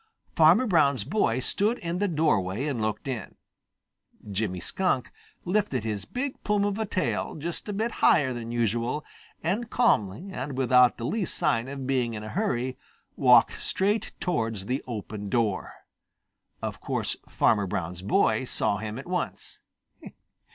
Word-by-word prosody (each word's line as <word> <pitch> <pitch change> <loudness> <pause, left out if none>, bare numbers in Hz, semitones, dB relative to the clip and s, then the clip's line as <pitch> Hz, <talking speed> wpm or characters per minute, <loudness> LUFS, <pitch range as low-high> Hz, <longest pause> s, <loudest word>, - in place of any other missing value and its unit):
Farmer 165 +10 +6
Brown's 145 - +3
boy 130 - +1
stood 210 - +1
in 170 +1 -3
the 205 - +2
doorway 130 - +1
and 135 -7 -2
looked 110 +4 -2
in. 125 -5 -4 1.0
Jimmy 95 -2 -1
Skunk 180 - 0 0.3
lifted 180 - 0
his 105 -3 -3
big 260 - -4
plume 205 -1 +2
of 205 +1 -1
a 220 - -1
tail 185 - -1
just 170 +6 -5
a - - -2
bit 220 +4 -1
higher 135 -5 +5
than 115 -1 -5
usual 120 +5 0 0.4
and 210 +8 -1
calmly 180 - +1
and 135 -4 -5
without 125 -1 +5
the 115 - -4
least 210 - -1
sign 140 -8 +1
of 135 -1 -5
being 125 -3 0
in 105 - -6
a 110 - -6
hurry 130 - -1 0.4
walked 125 -3 +5
straight 205 +3 0
towards 115 - -1
the 130 +4 -2
open 105 -3 -5
door. 110 -5 0 0.9
Of - - -4
course - - -2
Farmer 105 -3 +2
Brown's 90 -1 -3
boy 100 - +2
saw 100 - 0
him 105 +1 -5
at 135 - -7
once. 180 -1 -3
130 Hz, 150 wpm, -27 LUFS, 110-180 Hz, 1.0 s, Farmer